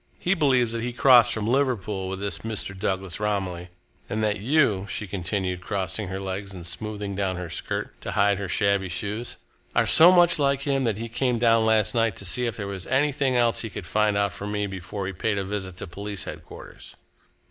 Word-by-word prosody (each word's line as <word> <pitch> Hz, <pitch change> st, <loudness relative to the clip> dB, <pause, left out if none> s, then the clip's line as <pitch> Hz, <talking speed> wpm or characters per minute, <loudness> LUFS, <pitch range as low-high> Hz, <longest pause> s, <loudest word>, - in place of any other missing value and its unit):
"He 180 Hz, -, +1 dB
believes 130 Hz, -9 st, +2 dB
that 115 Hz, -, -2 dB
he 120 Hz, +1 st, -3 dB
crossed 120 Hz, -2 st, +6 dB
from 110 Hz, -2 st, -2 dB
Liverpool 110 Hz, -7 st, 0 dB
with 95 Hz, 0 st, -4 dB
this 100 Hz, 0 st, -3 dB
Mr. 110 Hz, -3 st, -3 dB
Douglas 95 Hz, -1 st, -3 dB
Romilly, 95 Hz, -4 st, -2 dB, 0.4 s
and 110 Hz, +1 st, -1 dB
that 105 Hz, -1 st, 0 dB
you," 110 Hz, -5 st, +2 dB
she 105 Hz, -, -3 dB
continued, 90 Hz, -1 st, -2 dB
crossing 95 Hz, +1 st, -3 dB
her 95 Hz, +1 st, -4 dB
legs 95 Hz, +1 st, -5 dB
and 85 Hz, -2 st, -9 dB
smoothing 100 Hz, +3 st, -4 dB
down 95 Hz, -1 st, -1 dB
her 90 Hz, -2 st, -6 dB
skirt -, -, -4 dB
to -, -, -5 dB
hide 100 Hz, -1 st, +3 dB
her 100 Hz, -2 st, -4 dB
shabby 100 Hz, 0 st, +1 dB
shoes, 105 Hz, +6 st, -4 dB, 0.4 s
"are -, -, +4 dB
so 170 Hz, +3 st, +8 dB
much 175 Hz, -3 st, +5 dB
like 140 Hz, -1 st, +2 dB
him 135 Hz, -2 st, 0 dB
that 110 Hz, -4 st, 0 dB
he 115 Hz, +1 st, -4 dB
came 125 Hz, +1 st, 0 dB
down 115 Hz, -1 st, +3 dB
last 110 Hz, -3 st, +3 dB
night 115 Hz, -3 st, +1 dB
to 100 Hz, -, -8 dB
see 125 Hz, +6 st, 0 dB
if 115 Hz, -, -4 dB
there 100 Hz, -, -4 dB
was 95 Hz, -2 st, -6 dB
anything 135 Hz, 0 st, +1 dB
else 120 Hz, -1 st, +2 dB
he 115 Hz, -, -4 dB
could 100 Hz, -, -7 dB
find 105 Hz, +3 st, +1 dB
out 100 Hz, -2 st, +1 dB
from 100 Hz, +3 st, -6 dB
me 105 Hz, 0 st, -1 dB
before 95 Hz, +1 st, -5 dB
he 95 Hz, -, -4 dB
paid 105 Hz, +3 st, -1 dB
a 100 Hz, -, -1 dB
visit 95 Hz, -2 st, -5 dB
to -, -, -5 dB
police 100 Hz, +2 st, -5 dB
headquarters." -, -, -10 dB
105 Hz, 210 wpm, -25 LUFS, 95-115 Hz, 0.4 s, so